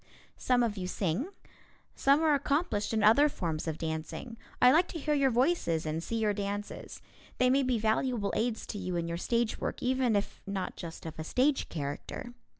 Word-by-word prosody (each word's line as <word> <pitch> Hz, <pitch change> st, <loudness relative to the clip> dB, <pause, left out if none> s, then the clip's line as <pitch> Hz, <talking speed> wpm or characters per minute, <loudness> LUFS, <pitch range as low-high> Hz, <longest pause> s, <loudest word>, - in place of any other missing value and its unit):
Some 250 Hz, -1 st, +3 dB
of 220 Hz, -3 st, -1 dB
you 180 Hz, -1 st, -3 dB
sing. 185 Hz, -, -1 dB, 0.7 s
Some 280 Hz, +3 st, +3 dB
are 310 Hz, -2 st, +4 dB
accomplished 280 Hz, -6 st, 0 dB
in 220 Hz, -2 st, +1 dB
other 280 Hz, +8 st, +6 dB
forms 165 Hz, -, -3 dB
of 160 Hz, -1 st, -2 dB
dancing. 160 Hz, +9 st, -5 dB, 0.2 s
I 250 Hz, -, +7 dB
like 335 Hz, +5 st, +4 dB
to -, -, -6 dB
hear 300 Hz, 0 st, 0 dB
your 275 Hz, -2 st, +3 dB
voices 245 Hz, -, +1 dB
and 155 Hz, +1 st, -2 dB
see 230 Hz, -, -4 dB
your 215 Hz, -2 st, +1 dB
dances. 205 Hz, 0 st, -5 dB, 0.3 s
They 250 Hz, 0 st, +4 dB
may 275 Hz, +2 st, +4 dB
be 255 Hz, -2 st, +1 dB
valuable 220 Hz, 0 st, 0 dB
aids 230 Hz, -1 st, -1 dB
to 205 Hz, -, -5 dB
you 180 Hz, -2 st, -3 dB
in 170 Hz, -1 st, -1 dB
your 170 Hz, 0 st, -3 dB
stage 235 Hz, +4 st, 0 dB
work, -, -, -3 dB
even 255 Hz, -3 st, +2 dB
if 200 Hz, -, -2 dB
not 195 Hz, -2 st, -3 dB
just 165 Hz, -2 st, -8 dB
of 160 Hz, -1 st, -7 dB
a -, -, -2 dB
stage 265 Hz, -, +1 dB
character. 145 Hz, +10 st, -5 dB
220 Hz, 195 wpm, -30 LUFS, 175-260 Hz, 0.7 s, I